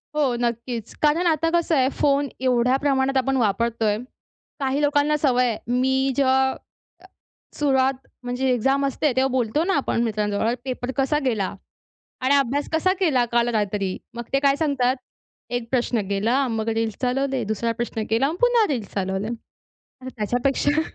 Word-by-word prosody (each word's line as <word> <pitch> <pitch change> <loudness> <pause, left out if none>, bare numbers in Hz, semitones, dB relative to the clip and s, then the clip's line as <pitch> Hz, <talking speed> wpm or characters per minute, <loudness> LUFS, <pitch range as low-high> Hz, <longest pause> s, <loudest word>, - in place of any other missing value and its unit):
हो 280 -5 +1
नक्कीच. 235 -1 -3
कारण 310 +4 +3
आता 325 0 +2
कसं 340 -1 +2
आहे, 260 -2 +3
फोन 280 0 +1
एवढ्या 250 0 +2
प्रमाणात 270 -1 +1
आपण 270 +1 +1
वापरतोय. 225 -1 +1 0.6
काही 275 +1 0
लोकांना 290 +1 +2
सवय 255 -4 +2
आहे, 225 -3 -1 0.2
मी 265 +1 +2
जेव्हा 265 -1 +2 1.0
सुरुवात 270 -2 +2 0.3
म्हणजे 250 +2 -1
एक्झाम 270 +3 +1
असते 275 +2 0
तेव्हा 265 0 +2
बोलतो 255 +4 0
ना 385 - +1
आपण 235 -4 0
मित्रांजवळ, 215 0 0
"पेपर 255 -1 -3
कसा 275 +2 +2
गेला? 215 -7 0 0.7
आणि 260 +2 +2
अभ्यास 280 +1 +1
कसा 325 +4 +2
केला 280 -10 +3
काल 235 0 +3
रात्री?" 205 -3 -1 0.2
मग 235 - -4
ते 275 - +4
काय 280 0 +3
सांगतात? 270 -5 +1 0.5
एक 245 -1 -3
प्रश्न 245 -2 +1
गेला, 230 +7 +1
मग 220 +1 -2
रील्स 225 -1 -1
चालवले, 265 +1 0
दुसरा 220 +2 -1
प्रश्न 230 -1 -3
केला 230 +5 +3
आणि 315 +4 -2
पुन्हा 485 -3 +4
रील्स 225 -7 -3
चालवले 190 +1 -2
आणि 235 -1 -9 0.6
त्याच्यापेक्षा 270 +7 +1
260 Hz, 155 wpm, -23 LUFS, 230-280 Hz, 1.0 s, ते